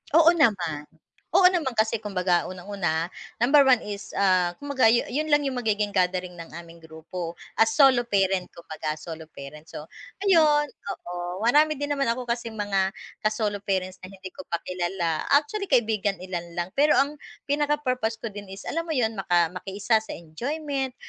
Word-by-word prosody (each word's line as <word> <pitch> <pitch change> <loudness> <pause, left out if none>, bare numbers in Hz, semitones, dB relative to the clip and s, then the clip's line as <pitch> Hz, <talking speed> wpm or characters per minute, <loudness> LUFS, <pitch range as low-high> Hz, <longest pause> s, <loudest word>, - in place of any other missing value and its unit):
Oo 330 0 +8
naman, 180 - +1 0.5
oo - - +6
naman 305 -9 -1
kasi 220 0 +1
kumbaga 180 -4 0
unang-una, 180 -3 -3 0.3
number 275 +2 +6
one 255 -3 +5
is, 205 -1 -7
ah, 185 -3 +2
kumbaga 280 -4 +1
yu 235 +2 +4
yun 305 +4 -1
lang 290 -1 +3
yung 265 -3 -2
magiging 210 -3 0
gathering 180 -1 0
ng 165 - -8
aming 170 0 -11
grupo, 165 +2 -7 0.2
as 225 0 +4
solo 265 -5 +5
parent 195 -3 +1
kumbaga 155 -2 -5
solo 160 0 -9
parents 150 +3 -11
so, - - -6 0.4
ayun 310 -6 +5
oo 180 0 -6
marami 300 +6 +4
din 290 +1 -3
naman 275 -2 0
ako 245 +2 -1
kasing 235 -2 -3
mga 195 -2 +1 0.3
ka-solo 215 -1 -1
parents 185 -2 -2
na 185 - -8
hindi 190 -1 -10
ko 280 - -8
pa 170 - 0
kilala 175 -3 -2
actually 395 +8 0
kaibigan 220 -6 +2
ilan 175 -2 -5
lang 175 +1 -2
pero 295 +2 +4
ang 280 +2 +2 0.3
pinaka-purpose 280 -6 0
ko 230 - -3
din 205 0 -8
is 195 +1 -9
alam 330 - -1
mo 320 - -2
yun 230 -4 +1
maka 175 -2 +2
makiisa 200 +4 0
sa 220 - -8
enjoyment, 265 - -4
205 Hz, 170 wpm, -25 LUFS, 180-270 Hz, 0.5 s, Oo